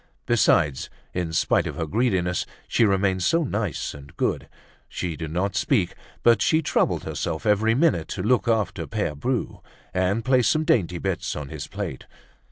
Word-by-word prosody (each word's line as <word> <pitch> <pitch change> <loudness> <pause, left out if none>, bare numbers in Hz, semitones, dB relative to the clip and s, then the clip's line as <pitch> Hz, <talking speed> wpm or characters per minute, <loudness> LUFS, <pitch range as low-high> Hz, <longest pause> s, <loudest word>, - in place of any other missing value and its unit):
Besides, 85 - +2 0.2
in 90 -2 -2
spite 80 - +2
of - - -5
her 80 - -2
greediness, 90 -2 0 0.2
she 115 - +3
remained 95 -2 +1
so 165 - +2
nice 105 - -2
and 70 0 -13
good! - - -1 0.4
She 85 -3 -3
did 80 -1 -5
not 95 +4 -1
speak, 105 - +1 0.3
but 115 -2 +5
she 160 0 +3
troubled - - +1
herself 80 - -3
every 110 +2 +3
minute 130 - +2
to 90 - -4
look 125 +3 +2
after 110 -4 0
Pere 105 -8 -2
Bru, 120 - -2 0.3
and 95 +5 0
place 130 -3 +4
some 155 - +2
dainty 90 - +2
bit 95 +1 -2
on 75 -2 -6
his - - -6
plate. - - -6
100 Hz, 170 wpm, -24 LUFS, 85-115 Hz, 0.4 s, but